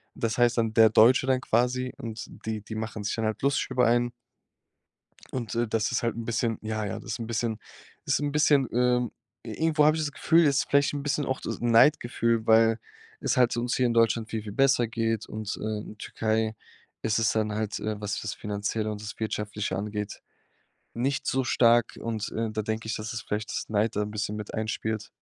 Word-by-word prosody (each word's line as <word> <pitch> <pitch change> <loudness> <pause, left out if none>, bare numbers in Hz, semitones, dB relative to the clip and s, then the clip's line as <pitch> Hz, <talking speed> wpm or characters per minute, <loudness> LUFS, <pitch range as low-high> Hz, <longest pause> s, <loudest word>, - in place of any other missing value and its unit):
Das 115 -1 -2
heißt 120 0 +3
dann 115 -1 0
„der 110 0 +7
Deutsche“ 120 +4 +6
dann 130 -1 +2
quasi 125 +2 +1
und 115 -1 -6 0.2
die 110 -1 -3
die 110 +2 -8
machen 110 -1 -4
sich 100 - -1
dann 115 - -1
halt 110 -1 -2
lustig 140 0 +1
über 125 -2 +3
einen. 120 +1 +2 1.2
Und, 120 -3 -4
äh, 120 +1 +2
das 110 +3 0
ist 125 - 0
halt 115 - 0
'n 115 - -4
bisschen 115 -1 -1
ja, 110 -1 -3
ja, 100 - -4
das 120 - -8
ist - - -3
'n 115 - -4
bisschen 115 -1 -1 0.5
ist - - +2
'n 145 0 -1
bisschen 145 -3 +4
ähm, 125 -1 +2 0.3
irgendwo 160 -2 +1
habe 155 +1 +5
ich 160 - -1
das 145 - -2
Gefühl, 165 +3 +3
es 140 -2 +3
ist - - 0
vielleicht 140 0 +3
'n 145 -1 -3
bisschen 145 0 0
auch 130 0 -2
das - - -5
Neidgefühl, 115 -1 +3
weil 115 0 +5 0.4
es - - 0
halt 125 -2 +4
uns 120 +1 -1
hier 130 - +2
in 120 - +1
Deutschland 115 -1 +2
viel, 110 -2 -3
viel 105 - -7
besser 135 +1 +3
geht 115 -1 -1
und, 110 -1 -5
äh, - - -10 0.2
in 105 - -10
Türkei 110 0 -1 0.5
ist 110 -1 +1
es 115 -1 +2
dann 110 -1 0
halt, 110 0 -2
äh, 110 -1 -3
was 105 -1 -2
das 110 - -3
Finanzielle 105 +1 -3
und 105 -1 -6
das 105 0 -7
Wirtschaftliche 105 -3 -3
angeht, 105 0 -4 0.7
nicht 135 +4 -1
so 130 0 +1
stark 120 -1 +3
und, 110 -2 -3
äh, 115 0 -2
da 110 0 -2
denke 110 +1 -3
ich, 110 - -2
dass 110 +2 -5
es 115 - -4
vielleicht 105 +1 -3
das - - -3
Neid 110 +1 +1
da 105 - +1
'n 105 - -4
bisschen 105 0 -3
mit 105 -1 -7
einspielt. 110 -1 -3
115 Hz, 220 wpm, -27 LUFS, 110-125 Hz, 1.2 s, der